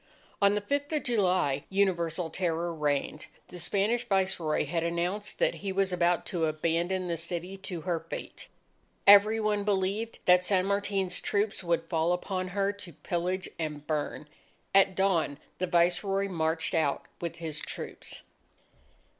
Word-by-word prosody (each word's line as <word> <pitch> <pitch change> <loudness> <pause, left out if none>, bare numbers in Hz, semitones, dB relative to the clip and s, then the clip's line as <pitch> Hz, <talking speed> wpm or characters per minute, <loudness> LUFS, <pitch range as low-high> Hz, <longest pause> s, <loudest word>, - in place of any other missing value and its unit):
On 200 0 +5
the 210 - 0
Fifth 285 +7 -2
of 300 - 0
July, 185 - +1
universal 175 -4 0
terror 170 -1 -1
reigned. 150 -1 -1 0.2
The 180 - -9
Spanish 205 +7 +1
Viceroy 190 -6 +1
had 165 +3 -1
announced 175 +5 -2
that - - +2
he 195 - -2
was 190 -1 +1
about 175 -1 +2
to 170 -3 -1
abandon 170 +4 0
the 170 -1 -1
city 175 +3 -4
to 180 -3 -6
her 175 -1 -1
fate. 165 - -8 0.6
Every 205 +2 +8
one 210 -1 +1
believed 200 +3 0
that 180 0 +6
San 185 0 +2
Martin's 200 -2 -1
troops 200 -1 -1
would 170 -1 +1
fall 165 0 +1
upon 185 +1 -2
her 200 +2 0
to 200 -4 -11
pillage 180 +5 -2
and 150 -2 -4
burn. 150 0 -2 0.5
At 195 -1 +5
dawn 180 -7 +1 0.2
the 185 - 0
Viceroy 180 +3 +2
marched 160 -3 -1
out 145 -4 +1 0.2
with 170 -1 -4
his 160 -3 -5
troops. - - -6
180 Hz, 150 wpm, -29 LUFS, 165-195 Hz, 0.6 s, Every